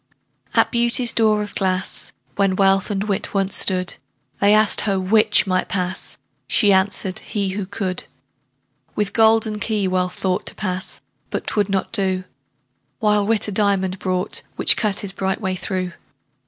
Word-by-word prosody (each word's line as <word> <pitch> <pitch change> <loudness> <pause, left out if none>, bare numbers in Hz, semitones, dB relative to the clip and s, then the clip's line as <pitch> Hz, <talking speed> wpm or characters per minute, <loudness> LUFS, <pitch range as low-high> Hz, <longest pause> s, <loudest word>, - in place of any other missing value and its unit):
At - - +3
Beauty's 235 0 +4
door 215 -2 +2
of 205 - -9
glass, 185 -1 -2 0.2
When 195 -2 +1
Wealth 195 0 +2
and 200 -1 -2
Wit 205 -1 -2
once 195 0 0
stood, 185 -2 +2 0.4
They 200 - +4
asked 215 0 +5
her 195 -2 0
'which 215 +4 +4
might 185 -1 -1
pass?" 185 -1 -3 0.3
She 205 -3 +4
answered, 190 -1 +1
"he, 200 -2 -3
who 190 0 -4
could." 190 -2 -3 0.9
With 210 -2 -1
golden 220 -1 +3
key 210 -3 -1
Wealth 180 -1 -1
thought 185 -1 -2
To - - 0
pass 185 -2 -4 0.3
but - - -4
'twould 205 -2 0
not 195 -1 -2
do: 190 -4 -1 0.7
While 210 -2 +1
Wit 225 -1 +2
a - - -4
diamond 195 -2 0
brought, 185 -1 -2
Which - - +5
cut 210 -3 0
his 200 - -4
bright 190 0 -3
way 190 -4 -2
through. 185 0 -3
195 Hz, 160 wpm, -20 LUFS, 185-210 Hz, 0.9 s, asked